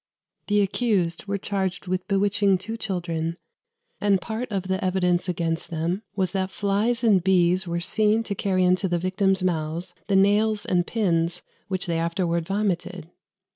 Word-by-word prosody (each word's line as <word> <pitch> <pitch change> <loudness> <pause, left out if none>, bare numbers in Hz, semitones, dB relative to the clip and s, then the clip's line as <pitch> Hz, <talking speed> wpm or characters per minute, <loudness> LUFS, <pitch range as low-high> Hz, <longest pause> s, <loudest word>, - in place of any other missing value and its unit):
The 205 0 +3
accused 200 -3 0
were 200 0 -1
charged 190 -2 -2
with 185 0 -2
bewitching 200 -1 +2
two 225 +5 -6
children; 170 -6 -3 0.6
and 200 -2 +3
part 225 +5 -5
of 195 -3 -1
the 190 0 -2
evidence 180 -1 +1
against 165 -1 -2
them 170 +4 -2
was 190 -3 0
that 190 -1 -1
flies 210 +5 0
and 200 -6 +4
bees 180 0 +3
were 170 0 -1
seen 215 +5 +2
to 215 - -3
carry 190 -1 0
into 185 +2 +3
the 175 -1 0
victims' 190 +2 +1
mouths 170 0 -2
the 200 - +1
nails 205 +2 +3
and 180 -5 +1
pins 175 -5 0 0.2
which 185 -1 -2
they 170 -2 -1
afterwards 170 0 -1
vomited. 185 -4 -2
190 Hz, 160 wpm, -25 LUFS, 175-200 Hz, 0.6 s, and